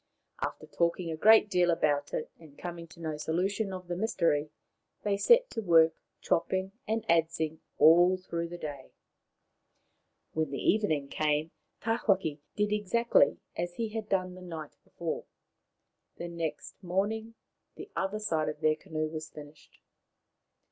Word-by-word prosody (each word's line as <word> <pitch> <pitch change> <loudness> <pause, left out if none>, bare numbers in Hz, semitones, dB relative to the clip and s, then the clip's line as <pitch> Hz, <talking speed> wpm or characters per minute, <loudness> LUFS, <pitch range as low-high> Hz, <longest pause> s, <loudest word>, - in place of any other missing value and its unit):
After - - -3
talking 170 0 0
a - - -2
great 215 +6 +6
deal 180 -3 +2
about 145 -4 +1
it, 155 - -3
and 155 -4 -16
coming 170 -1 -6
to 170 +1 -16
no 155 -2 -3
solution 190 +7 -1
of 185 -1 -7
the 175 - -2
mystery, 170 -7 +1 0.5
they 205 -1 +1
set 480 - +5
to 225 - -3
work, 165 -4 +5 0.3
chopping 190 +3 0 0.2
and 220 +1 -1
adzing 160 -1 +1 0.2
all 175 +3 +7
through 170 -2 -4
the 175 +1 -7
day. 145 -5 -7 1.4
When 160 -2 0
the 140 - -4
evening 155 - +1
came 155 +1 0 0.3
Tawhaki 195 -9 +1 0.2
did 210 0 +1
exactly 210 +3 +3 0.2
as 175 +1 -3
he 230 -1 -2
had 215 -1 -5
done 185 -1 0
the 185 - -11
night 165 -4 -7
before. - - -5 0.9
The 170 - -5
next 165 -2 -5
morning 210 +5 -1 0.4
the - - -10
other 195 +2 -1
side 165 -8 0
of 150 - -6
their 155 0 +4
canoe 155 0 -3
was 155 0 -6
finished. 150 0 -13
170 Hz, 150 wpm, -30 LUFS, 155-200 Hz, 1.4 s, all